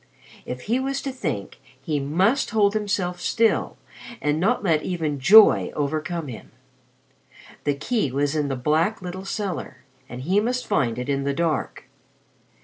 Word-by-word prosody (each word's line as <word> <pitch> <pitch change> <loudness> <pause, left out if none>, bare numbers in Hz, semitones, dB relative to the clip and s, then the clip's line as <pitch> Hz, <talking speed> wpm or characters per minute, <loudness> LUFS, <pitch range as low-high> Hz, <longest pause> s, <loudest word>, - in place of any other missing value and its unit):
If 125 0 -5
he 235 - 0
was 270 +1 -2
to 275 - -3
think, 150 - -5 0.2
he 145 +2 -2
must 185 - +1
hold 205 -2 +2
himself 195 -4 -2
still 225 +3 +1 0.4
and 150 +1 0
not 215 +6 +1
let 160 -5 +2
even 160 -6 -2
joy 210 +10 +7
overcome 155 +2 -2
him. 120 -4 -9 1.2
The 145 -1 +1
key 155 - -1
was 140 +3 0
in 150 -2 0
the 135 - -2
black 160 - 0
little 185 +2 -6
cellar, 195 -7 -4 0.3
and 125 +1 -7
he 185 +7 +2
must 250 +4 -1
find 120 - 0
it 125 - -4
in 140 -1 0
the 140 0 -1
dark. 160 -2 -2
165 Hz, 155 wpm, -23 LUFS, 140-210 Hz, 1.2 s, joy